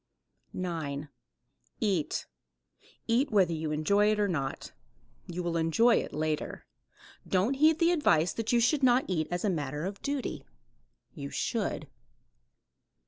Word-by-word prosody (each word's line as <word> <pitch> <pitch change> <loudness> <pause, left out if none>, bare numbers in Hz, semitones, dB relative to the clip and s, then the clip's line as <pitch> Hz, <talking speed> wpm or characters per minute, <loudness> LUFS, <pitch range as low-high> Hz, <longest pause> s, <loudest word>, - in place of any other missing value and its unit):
9. 155 -5 -4 0.7
EAT. 190 -9 0 0.8
Eat 250 +5 +2
whether 185 -5 +3
you 155 -1 -3
enjoy 200 +8 +3
it 215 - 0
or 205 - +2
not. 140 -7 -3 0.6
You 180 +1 -4
will 170 -1 -1
enjoy 165 +9 +4
it - - -3
later. 155 0 -3 0.6
Don't 195 +7 +2
heed 310 +3 +4
the 335 +1 +3
advice 175 - +3
that 225 -1 -2
you 240 - +4
should 275 +5 +2
not 255 0 +4
eat 160 -4 -1
as 175 +3 -2
a - - +2
matter 150 -1 -3
of 200 +1 -5
duty. 280 -2 -3 0.7
You 70 - -6
should. - - -2
185 Hz, 140 wpm, -29 LUFS, 155-235 Hz, 0.8 s, enjoy